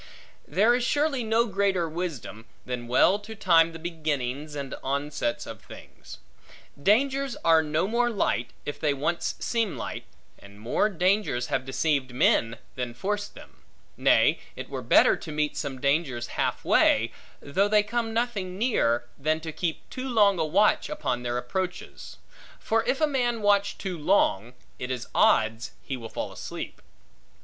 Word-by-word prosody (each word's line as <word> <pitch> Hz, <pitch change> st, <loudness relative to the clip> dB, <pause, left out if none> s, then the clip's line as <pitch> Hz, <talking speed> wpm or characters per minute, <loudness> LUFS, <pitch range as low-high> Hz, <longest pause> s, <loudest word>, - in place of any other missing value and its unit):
There 205 Hz, +10 st, +3 dB
is 245 Hz, 0 st, +1 dB
surely 285 Hz, 0 st, +1 dB
no 225 Hz, +1 st, +2 dB
greater 195 Hz, -4 st, 0 dB
wisdom, 155 Hz, -9 st, -5 dB, 0.2 s
than 125 Hz, -1 st, -4 dB
well 180 Hz, +11 st, +4 dB
to 215 Hz, +2 st, -10 dB
time 170 Hz, -5 st, +4 dB
the 165 Hz, -, -8 dB
beginnings, 150 Hz, -4 st, -3 dB
and 140 Hz, -2 st, -5 dB
onsets, 140 Hz, -2 st, -2 dB
of -, -, -9 dB
things. -, -, -12 dB, 0.6 s
Dangers 270 Hz, -, +2 dB
are 165 Hz, -1 st, +6 dB
no 155 Hz, +4 st, 0 dB
more 240 Hz, +2 st, +1 dB
light, 155 Hz, -, 0 dB, 0.2 s
if 145 Hz, -, -5 dB
they 145 Hz, -2 st, +1 dB
once 165 Hz, +5 st, -1 dB
seem 225 Hz, -5 st, -1 dB
light; -, -, -5 dB, 0.3 s
and 100 Hz, 0 st, -15 dB
more 120 Hz, -, +1 dB
dangers 185 Hz, -9 st, 0 dB
have 130 Hz, -, 0 dB
deceived 135 Hz, -2 st, 0 dB
men, 115 Hz, -2 st, +2 dB, 0.2 s
than 125 Hz, -2 st, -4 dB
forced 205 Hz, +9 st, -3 dB
them. -, -, -15 dB, 0.3 s
Nay, -, -, +4 dB, 0.2 s
it -, -, -8 dB
were -, -, -4 dB
better, -, -, +5 dB
to 165 Hz, -, -8 dB
meet 150 Hz, 0 st, -1 dB
some 135 Hz, -3 st, -4 dB
dangers 140 Hz, -4 st, 0 dB
half -, -, -2 dB
way, -, -, +4 dB, 0.3 s
though 190 Hz, +8 st, +1 dB
they 210 Hz, 0 st, +4 dB
come 225 Hz, +2 st, -2 dB
nothing 220 Hz, -6 st, -2 dB
near, 120 Hz, -, +1 dB
than 155 Hz, +3 st, +1 dB
to 160 Hz, 0 st, -5 dB
keep 165 Hz, 0 st, -4 dB
too 260 Hz, 0 st, -5 dB
long 205 Hz, -6 st, +4 dB
a -, -, +2 dB
watch 200 Hz, +7 st, +2 dB
upon 125 Hz, -4 st, -2 dB
their 120 Hz, 0 st, -2 dB
approaches; 180 Hz, +9 st, -5 dB, 0.4 s
for 225 Hz, 0 st, 0 dB
if 270 Hz, -, 0 dB
a -, -, +6 dB
man 245 Hz, -6 st, -1 dB
watch 205 Hz, 0 st, +2 dB
too 185 Hz, -4 st, -5 dB
long, 125 Hz, -, +1 dB, 0.2 s
it 125 Hz, -, -4 dB
is 125 Hz, -2 st, -3 dB
odds 110 Hz, +1 st, +2 dB
he 135 Hz, -, -4 dB
will 115 Hz, -3 st, -8 dB
fall -, -, -5 dB
asleep. -, -, -7 dB
165 Hz, 160 wpm, -26 LUFS, 130-210 Hz, 0.6 s, are